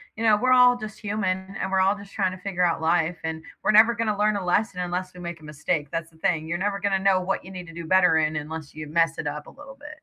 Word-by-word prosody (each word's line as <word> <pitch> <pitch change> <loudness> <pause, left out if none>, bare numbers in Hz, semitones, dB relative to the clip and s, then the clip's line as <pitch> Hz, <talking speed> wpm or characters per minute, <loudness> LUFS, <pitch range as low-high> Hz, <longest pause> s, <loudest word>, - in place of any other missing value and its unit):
you 225 - -5
know, 215 -2 +5
we're 255 +2 +3
all 250 -1 +6
just 215 -2 -8
human 195 -2 -2
and 190 - -3
we're 190 - +2
all 195 +2 +3
just 200 -1 -13
tryna 185 -2 -1
figure 180 -2 -1
out 170 -2 +2
life, 165 +1 +1
and 160 0 -4 0.2
we're - - +3
never 225 +2 +6
gonna 220 -2 -1
learn 210 0 +2
a 190 - -4
lesson 180 +1 0
unless 180 +1 -3
we - - -11
make 170 -1 -6
a - - -16
mistake, 150 0 -2
that's 165 0 -4
the 160 - -22
thing. 160 -1 0
You're 170 +2 -2
never 200 0 -1
gonna 195 -1 +1
know 190 -1 +3
what 190 +2 -2
you 185 - -11
need 180 -2 -8
to 165 - -11
do 170 0 -7
better 180 -1 +4
in 155 0 +1
unless 150 0 -6
you 155 -1 -7
mess 165 +1 +1
it - - -4
up 150 0 -5
a - - -10
little 280 -1 -13
bit. 290 0 -10
185 Hz, 285 wpm, -25 LUFS, 165-205 Hz, 0.2 s, all